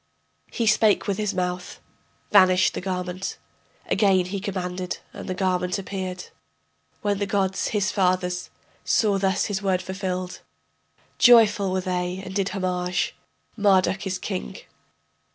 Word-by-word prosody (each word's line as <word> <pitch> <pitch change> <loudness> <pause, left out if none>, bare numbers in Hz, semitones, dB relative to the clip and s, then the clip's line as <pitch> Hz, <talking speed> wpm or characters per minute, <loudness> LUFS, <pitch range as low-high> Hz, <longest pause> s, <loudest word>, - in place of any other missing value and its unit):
He 230 - -1
spake 215 -1 +3
with 200 0 -1
his 210 -1 0
mouth, 180 0 -3 0.5
vanished 185 -2 +5
the - - -4
garment; 180 0 -4 0.5
Again 190 -3 +3
he 195 +2 -4
commanded, 185 -2 -4 0.2
and - - -8
the 185 - -2
garment 180 0 0
appeared. 185 -2 -5 0.7
When 205 -1 0
the 200 - -1
gods, 195 -1 0
his 205 -2 0
fathers, 180 -2 0 0.3
saw 205 -3 +2
thus 190 -1 +1
his 205 -1 -2
word 190 -2 +1
fulfilled, 185 -1 -4 0.8
Joyful 215 -5 +6
were 185 0 0
they 180 0 -2
and 190 - -7
did 195 0 0
homage: 180 -2 -1 0.4
Marduk 195 -2 +2
is 185 -1 -2
king. 65 - -5
190 Hz, 135 wpm, -24 LUFS, 180-200 Hz, 0.8 s, Joyful